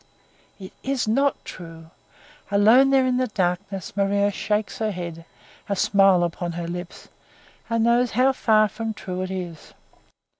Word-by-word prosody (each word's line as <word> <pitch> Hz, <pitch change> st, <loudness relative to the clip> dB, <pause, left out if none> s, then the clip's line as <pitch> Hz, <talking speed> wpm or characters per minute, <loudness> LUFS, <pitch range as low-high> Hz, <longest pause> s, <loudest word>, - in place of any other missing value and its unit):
It 190 Hz, -1 st, -10 dB
is 270 Hz, -3 st, -2 dB
not 275 Hz, +5 st, +1 dB
true! 165 Hz, -2 st, -11 dB, 0.6 s
Alone 220 Hz, +7 st, +5 dB
there 270 Hz, -1 st, +4 dB
in 255 Hz, -1 st, +1 dB
the 255 Hz, 0 st, 0 dB
darkness 185 Hz, -2 st, -3 dB
Maria 200 Hz, 0 st, +1 dB
shakes 210 Hz, +1 st, -2 dB
her 220 Hz, -1 st, 0 dB
head, 170 Hz, -4 st, -6 dB, 0.4 s
a 200 Hz, -, 0 dB
smile 195 Hz, -2 st, +4 dB
upon 175 Hz, 0 st, -3 dB
her 170 Hz, 0 st, -5 dB
lips, 175 Hz, +1 st, -7 dB, 0.6 s
and 230 Hz, -1 st, +1 dB
knows 240 Hz, +1 st, +3 dB
how 265 Hz, +1 st, +4 dB
far 215 Hz, -4 st, +3 dB
from 225 Hz, +1 st, -5 dB
true 185 Hz, -2 st, -5 dB
it 185 Hz, -, -4 dB
is. 175 Hz, -4 st, -7 dB
200 Hz, 150 wpm, -23 LUFS, 180-230 Hz, 0.6 s, Alone